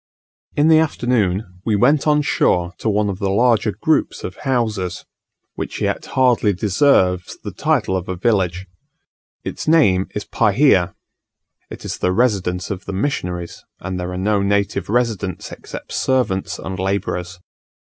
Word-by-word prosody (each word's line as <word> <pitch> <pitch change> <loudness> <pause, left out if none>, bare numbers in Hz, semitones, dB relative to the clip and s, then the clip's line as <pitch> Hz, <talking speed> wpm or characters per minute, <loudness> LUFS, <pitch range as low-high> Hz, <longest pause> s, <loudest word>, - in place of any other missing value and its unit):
In 145 +2 +3
the 160 -1 +6
afternoon 110 - 0
we 110 -1 +1
went 135 +8 +3
on 150 0 +3
shore 90 -9 +1
to 110 - -1
one 105 0 +1
of 100 -1 -3
the 100 -2 0
larger 115 +3 +3
groups - - 0
of 90 - -5
houses, 110 -9 -2 0.5
which - - -5
yet - - -1
hardly 120 -5 +4
deserves 95 -2 +2
the - - -5
title 95 - 0
of 95 -1 -3
a 95 - -2
village. 95 -3 0 0.8
Its - - -5
name 100 - +4
is 105 - -3
Pahia: 105 -4 +3 0.7
it - - -9
is - - -4
the 90 - +1
residence 95 -5 0
of 95 -1 -5
the 100 - -5
missionaries; 90 -6 -3 0.2
and 90 +1 -4
there 90 0 -4
are 90 - -4
no 100 +2 +1
native 100 -1 0
residents 110 -6 -1
except - - -9
servants 125 -8 0
and 95 0 -6
labourers. 95 -2 -2
100 Hz, 150 wpm, -20 LUFS, 90-120 Hz, 0.8 s, the